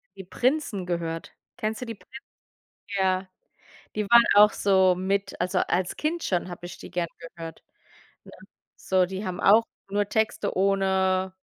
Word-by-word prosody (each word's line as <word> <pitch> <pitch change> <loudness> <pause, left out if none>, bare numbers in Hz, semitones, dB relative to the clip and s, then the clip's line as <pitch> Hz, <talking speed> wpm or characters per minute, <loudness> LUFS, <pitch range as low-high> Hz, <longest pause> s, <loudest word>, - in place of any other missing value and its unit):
die 190 - -9
Prinzen 240 - -1
gehört. 165 -2 -4 0.3
Kennst 215 +2 -3
du - - -3
die 230 -2 -6
Prinzen? 260 - -20 0.8
Ja, 190 0 +1 0.7
die 210 - 0
waren 235 0 +8
auch 210 0 +7
so 190 -2 +3
mit 195 +2 -2
also, 180 +1 0
als 185 +1 -1
Kind 325 +2 -2
schon 180 -1 -1
habe 175 0 -8
ich 175 - -8
die - - -11
gerne 175 -2 -2
gehört, 165 -1 -10 0.6
ne? - - -14 0.4
So, 185 -1 +1
die 190 +2 -5
haben 180 -1 -4
auch 220 +3 +6 0.3
nur 205 0 0
Texte 220 -3 -1
ohne 190 -1 +1
190 Hz, 155 wpm, -26 LUFS, 180-210 Hz, 0.8 s, waren